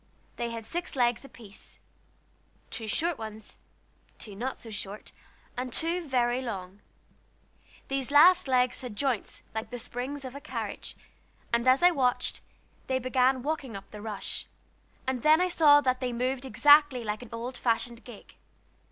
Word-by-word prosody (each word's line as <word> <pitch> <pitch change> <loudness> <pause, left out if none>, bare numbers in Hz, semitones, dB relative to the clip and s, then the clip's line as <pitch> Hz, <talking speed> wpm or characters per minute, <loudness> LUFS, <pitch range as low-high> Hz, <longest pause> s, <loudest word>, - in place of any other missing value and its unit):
They 235 - -2
had 230 -1 -6
six 345 +8 -4
legs 240 -1 +2
apiece, 230 -6 -14 0.9
two 225 - -5
short 325 +9 0
ones, 220 -1 -8 0.6
two 205 -3 -10
not 250 +6 -3
so 225 - -10
short, 205 0 -7 0.4
and 250 0 -4
two 335 +5 -1
very 245 -1 +1
long. 195 -5 -6 1.1
These 270 -1 -1
last 335 +4 +7
legs 255 -1 +2
had 245 -5 -7
joints 250 -1 -2
like 220 0 -4
the 245 - -5
springs 255 +4 -4
to 260 - -6
buggy 280 +3 -11
tops; - - -5 0.6
and 235 +2 +2
as 260 +5 +5
I 355 - +8
watched, 255 -6 0 0.5
they 260 - +1
began 255 0 +2
walking 280 -6 -3
up 195 - -13
the 210 - -9
rush, 210 -2 -5 0.6
and 260 -2 -1
then 310 +3 +6
I 365 0 +2
saw 295 -4 +6
that 255 -2 +1
they 250 -2 -2
moved 255 +2 -1
exactly 290 +1 +5
like 210 0 -3
an 245 - -10
old 235 +2 -5
fashioned 235 0 -1
gig. 240 -5 -13
250 Hz, 160 wpm, -28 LUFS, 230-275 Hz, 1.1 s, I